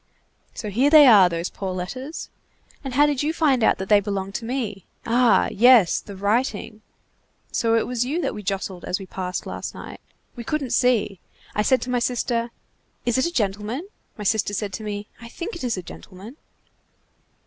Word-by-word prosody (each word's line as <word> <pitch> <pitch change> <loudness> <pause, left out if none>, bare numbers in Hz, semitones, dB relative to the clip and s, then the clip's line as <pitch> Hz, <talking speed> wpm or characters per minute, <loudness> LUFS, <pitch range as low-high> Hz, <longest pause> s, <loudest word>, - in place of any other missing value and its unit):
So 210 -3 -5
here 255 +8 +3
they 300 -1 +9
are, 205 -8 +7
those 170 +1 -3
poor 190 -2 -4
letters! 255 - -6 0.5
And 265 -2 -5
how 290 +2 +6
did 290 -3 0
you 300 +2 0
find 280 -8 +2
out - - +4
that 190 - -5
they 210 0 +6
belonged 195 -1 -4
to 230 - -9
me? 225 -6 -3 0.2
Ah! 240 +1 +3
yes, 235 -4 +5
the 200 - -10
writing. 215 +1 -1 0.7
So 230 -1 +1
it 225 - +2
was 245 -1 -1
you 285 +7 -2
that - - -2
we 210 - -7
jostled 190 -2 -4
as 180 - -2
we 195 - -8
passed 185 -1 -5
last - - -6
night. - - -10 0.3
We 240 - -7
couldn't 285 0 -2
see. 230 -6 +2 0.3
I 210 - +1
said 260 +4 +2
to 250 - -4
my 250 - +1
sister: 240 -1 -1 0.6
'Is 240 +1 +1
it 260 - +2
a - - -4
gentleman?' 220 - -2 0.3
My 210 - -6
sister 205 0 0
said 200 -1 -3
to 220 - -5
me: 205 -1 -5
'I 235 - -10
think 360 - -6
it 340 - -8
is 240 -4 -1
a 185 - -5
gentleman. 200 - -12
225 Hz, 195 wpm, -23 LUFS, 200-255 Hz, 0.7 s, they